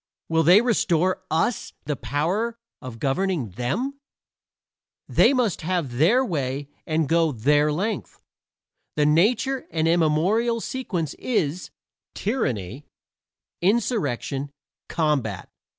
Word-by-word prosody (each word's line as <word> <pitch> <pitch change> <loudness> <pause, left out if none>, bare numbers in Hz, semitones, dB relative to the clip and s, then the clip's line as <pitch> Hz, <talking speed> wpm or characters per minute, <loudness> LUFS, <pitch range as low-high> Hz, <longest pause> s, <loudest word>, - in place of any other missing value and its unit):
Will 165 0 +3
they 180 +6 +7
restore 185 -7 +2
to - - -34
us 165 +8 0
the 150 0 -1
power 190 - -1 0.2
of 130 -4 -8
governing 140 - -1
them? 215 - -3 1.1
They - - +4
must 250 -8 0
have 160 -8 -2
their 235 - +4
way 140 - -3 0.2
and 155 -1 +1
go 165 0 +3
their 145 +5 +2
length. 200 +7 -3 0.8
The 150 - +2
natural 225 - +2
and 160 -1 0
immemorial 175 +9 +2
sequence 190 - -3
is: 180 - -1 0.5
tyranny, 130 - -2 0.7
insurrection, 170 - 0 0.4
combat. 140 - -1
165 Hz, 105 wpm, -24 LUFS, 145-215 Hz, 1.1 s, they